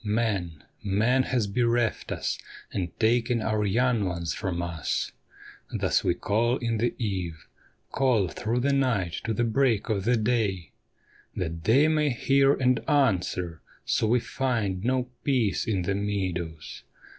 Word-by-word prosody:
*■ - - -28
Man, 105 -8 -1 0.2
man 110 +7 +2
has 125 -4 0
bereft 115 +2 0
us - - -2 0.3
and 90 -3 -2
taken 115 +1 +2
our 110 -1 0
young 120 +2 +2
ones 85 -3 -2
from 95 -5 -3
us; 85 -3 -2 0.6
Thus - - +1
we 85 - +1
call 115 +6 +1
in 115 -2 -2
the 120 +2 0
eve, 90 -8 -3 0.5
call 125 -8 +2
through 115 +8 -2
night 125 -11 +1
to 115 - -1
the 120 - +1
break 115 -1 +1
of 100 -3 -1 0.2
day, 105 -8 0 0.6
That 80 -2 -4
they 135 +8 +5
may 155 -1 +2
hear 135 +2 +3
and 125 -2 +2
answer; 90 - +1 0.2
so 110 - +1
we 120 +3 +3
find 115 -7 -2
no 125 +1 +1 0.2
peace 125 -6 +1
in 100 -5 0
the 95 - 0
meadows. 90 -6 -3
110 Hz, 145 wpm, -27 LUFS, 95-125 Hz, 0.6 s, they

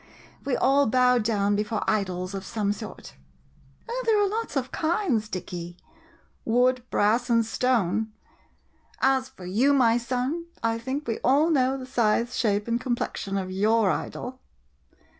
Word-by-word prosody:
We 275 - 0
all 275 +1 +3
bow 250 +1 +4
down 205 -2 +1
before 210 +1 -1
idols 185 -3 -1
of 195 -1 -5
some 205 0 -1
sort. - - -9 0.7
Oh, - - -3
there 435 -2 +4
are 410 - +3
lots 445 0 -3
of 260 -1 -2
kinds, 315 - 0
Dicky 175 -2 -6 0.3
— - - -29 0.3
wood, 250 +2 +2
brass, 230 +5 +2
and 230 -1 +3
stone! 220 -3 0 0.9
As 265 -1 +2
for 180 - -12
you, 235 +10 +2
my 240 -3 +4
son, 255 +8 -2 0.2
I 230 0 0
think 265 +5 -4
we 225 - -2
all 295 +6 +3
know 265 -2 +2
the 260 - -7
size, 235 -1 +1
shape, 205 -2 0
and 235 +1 0
complexion 235 -5 -2
of 185 -1 -3
your 210 +1 +2
idol. 255 +1 -5
235 Hz, 155 wpm, -26 LUFS, 210-260 Hz, 0.9 s, bow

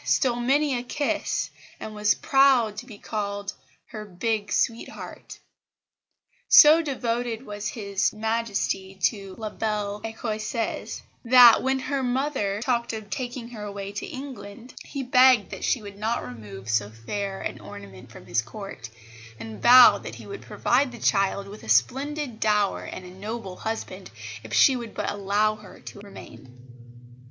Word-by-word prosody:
stole 245 -3 +2
many 275 +3 +2
a 240 - -2
kiss, 285 +4 -2 0.3
and 215 - -7
was 210 0 +2
proud 265 -6 +3
to 235 +4 -8
be 215 -5 -11
called 200 -2 -4 0.4
her 215 -1 -7
"big 205 +2 -2
sweetheart." 230 0 -3 1.1
So 310 +2 +9
devoted 245 -4 -2
was 205 0 -5
His 200 -3 -1
Majesty 215 -3 -2
to 195 -4 -1
La 215 -2 -5
belle 210 -1 -3
Ecossaise 225 0 -4 0.2
that, 245 -1 +8
when 265 +1 +1
her 270 +1 -2
mother 250 -6 -1
talked 235 -2 0
of 215 -2 -7
taking 245 -2 -5
her 225 -3 -9
away 200 -1 -6
to 200 - -5
England, 245 -3 -9
he 275 - -5
begged 255 -4 +5
that - - -7
she 235 - 0
would 200 -1 -10
not 225 +2 -1
remove 105 -5 -10
so 110 -2 0
fair 195 - -5
an - - -5
ornament 100 -2 -11
from - - -13
his 115 0 +1
Court, 195 - -9 0.5
and 110 -1 -8
vowed 250 +1 +8
that - - -8
he - - -11
would 400 - -8
provide 255 +2 +1
the 240 - -10
child 195 -2 +1
with 205 +2 -10
a - - -11
splendid 265 - +1
dower 210 -2 +1
and 185 - -8
a 180 - -10
noble 195 0 -6
husband 200 -4 -5 0.3
if 110 - -12
she 115 - +5
would 235 -2 -7
but - - -2
allow 205 +2 0
her 210 -3 -14
to - - -11
remain. 135 -10 -13
215 Hz, 155 wpm, -25 LUFS, 200-245 Hz, 1.1 s, So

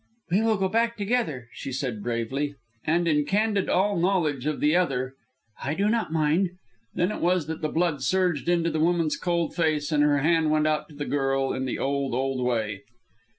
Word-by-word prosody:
"We 195 +4 +3
will 225 -1 +2
go 190 0 +1
back 230 +3 +1
together," 200 - -1
she 135 - -6
said, 125 -5 -3
bravely. 120 +6 -2 0.3
And 170 +2 +2
in 150 -2 +3
candid 205 +4 +1
all 195 0 +2
knowledge 165 -7 +1
of 150 - -1
the 150 +3 +3
other, 135 -7 0 0.5
"I 145 +3 -2
do 200 +3 +1
not 225 -6 0
mind." 160 +4 +2 0.5
Then 180 +3 +1
it - - -5
was 175 -1 +2
that 160 +1 -5
the 155 - -1
blood 165 -4 0
surged 180 0 +1
into 170 -1 +2
the 155 - -1
woman's 165 -1 +2
cold 170 -2 -1
face, 155 -2 0
and 150 -1 +3
her 145 -1 +4
hand 160 +2 +2
went 155 0 +2
out 155 0 0
to 150 - -14
the 145 0 -4
girl 135 -1 0
in 130 - -2
the 130 - -2
old, 140 -2 -1
old 135 0 -1
way. 110 -5 -1
155 Hz, 200 wpm, -26 LUFS, 135-180 Hz, 0.5 s, her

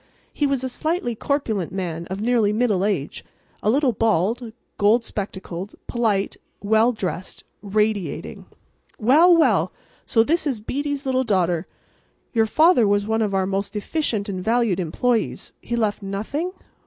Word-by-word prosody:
He 290 - +1
was 275 -2 -1
a - - 0
slightly 310 0 -1
corpulent 220 - -1
man 170 -3 -4
of 190 +2 -5
nearly 225 -2 +2
middle 210 -4 +1
age, 190 -9 -2 0.4
a - - +1
little 270 +2 +3
bald, 225 +2 0 0.3
gold 215 +4 +4
spectacled, 190 -2 -6
polite, 215 -5 0 0.2
well 220 +3 +3
dressed, 190 -5 -5 0.2
radiating. 210 -1 -2 0.5
"Well, 315 +10 +6
well, 320 - +4
and - - -16 0.4
so 225 - +4
this 320 +5 0
is 260 -6 -1
Beatty's 285 +5 -3
little 260 -1 +1
daughter! 180 -6 +1 0.7
Your 225 -2 +3
father 310 - +5
was 205 0 +2
one 220 +1 0
of 205 -3 0
our 190 -1 +2
most 195 +2 -2
efficient 215 -2 -1
and 185 -3 -4
valued 225 -4 +1
employees. 225 +7 -1
He 240 - -3
left 215 -3 0
nothing? 215 - -3
220 Hz, 150 wpm, -22 LUFS, 195-250 Hz, 0.7 s, Well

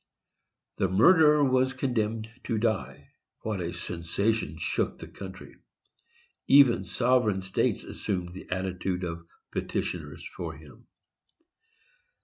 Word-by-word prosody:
The 95 - +2
murderer 150 - +6
was 130 0 +3
condemned 115 -4 -1 0.2
to 115 - 0
die—what 110 -1 -3
a 85 0 -3
sensation 90 +6 -1
shook - - -1
the - - -9
country! - - -10 0.9
Even 135 -8 +6
sovereign 110 0 +2
states 95 0 0
assumed 90 -3 -4
the 95 - -10
attitude 95 0 -2
of 85 -1 -5 0.2
petitioners - - -3
for - - -5
him. 70 -2 -16
105 Hz, 105 wpm, -28 LUFS, 90-125 Hz, 0.9 s, murderer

